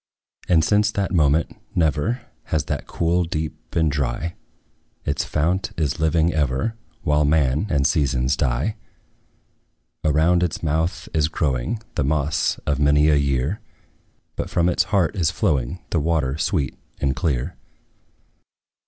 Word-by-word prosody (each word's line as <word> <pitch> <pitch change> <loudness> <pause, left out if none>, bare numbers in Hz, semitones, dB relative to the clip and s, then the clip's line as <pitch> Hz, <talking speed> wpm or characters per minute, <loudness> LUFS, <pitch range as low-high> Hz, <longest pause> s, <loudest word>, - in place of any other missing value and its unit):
And 80 -3 +5
since 105 0 +3
that 100 -1 -1
moment, 80 -1 +2 0.2
never 85 - +1 0.2
Has 80 -4 0
that - - -3
cool 85 +2 +1
deep 80 -2 -3
been 80 -1 +1
dry; 70 +3 -1 0.7
Its - - 0
fount 85 +5 0
is 75 -4 -1
living 80 +1 +2
ever, 75 - 0 0.3
While 75 0 +3
man 75 +3 +2
and 70 -2 +1
seasons 65 -2 +2
die. 65 - 0 1.3
Around 80 +3 +3
its 90 -2 -1
mouth 80 +4 -1
is 80 -2 +2
growing 75 - -1
The - - 0
moss 75 +2 +1
of 70 -2 0
many 75 +1 +4
a 75 - +5
year; 70 +5 0 0.8
But - - -3
from 85 0 +2
its - - +2
heart 100 -2 +1
is 85 -6 +2
flowing 85 - -1
The 85 - +2
water 75 -4 0
sweet 80 -7 0 0.2
and 70 -2 0
clear. 70 +2 -1
80 Hz, 135 wpm, -22 LUFS, 70-85 Hz, 1.3 s, And